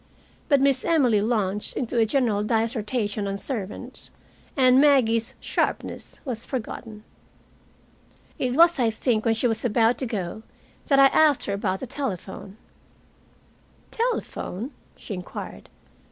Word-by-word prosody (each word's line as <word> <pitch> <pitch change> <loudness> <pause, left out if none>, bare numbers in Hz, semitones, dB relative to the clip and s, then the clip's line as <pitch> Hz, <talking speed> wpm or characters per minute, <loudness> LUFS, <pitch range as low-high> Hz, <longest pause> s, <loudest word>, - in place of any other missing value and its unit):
But 280 -3 +4
Miss 275 -2 +2
Emily 255 -11 +3
launched 210 -2 0
into 240 -1 -1
a 225 - +3
general 230 -5 +1
dissertation 220 -2 -1
on 195 0 -2
servants, 205 -4 -6 0.5
and 255 0 +6
Maggie's 255 -4 +3
sharpness - - -3
was 240 -4 -4
forgotten. 225 -3 -6 1.4
It 250 -1 -1
was, 335 0 +5
I 235 -2 +3
think, 220 0 0
when 225 -1 +3
she 225 - -2
was 225 -2 +1
about 230 0 +2
to 260 - -2
go 205 -2 -4 0.5
that 275 - +4
I 275 - +8
asked 305 -4 +4
her 200 - -2
about 190 -1 -2
the - - -3
telephone. 200 -6 -6 1.3
"Telephone?" 300 - -3 0.2
she 215 - -8
inquired. 180 -1 -8
230 Hz, 130 wpm, -25 LUFS, 210-265 Hz, 1.4 s, I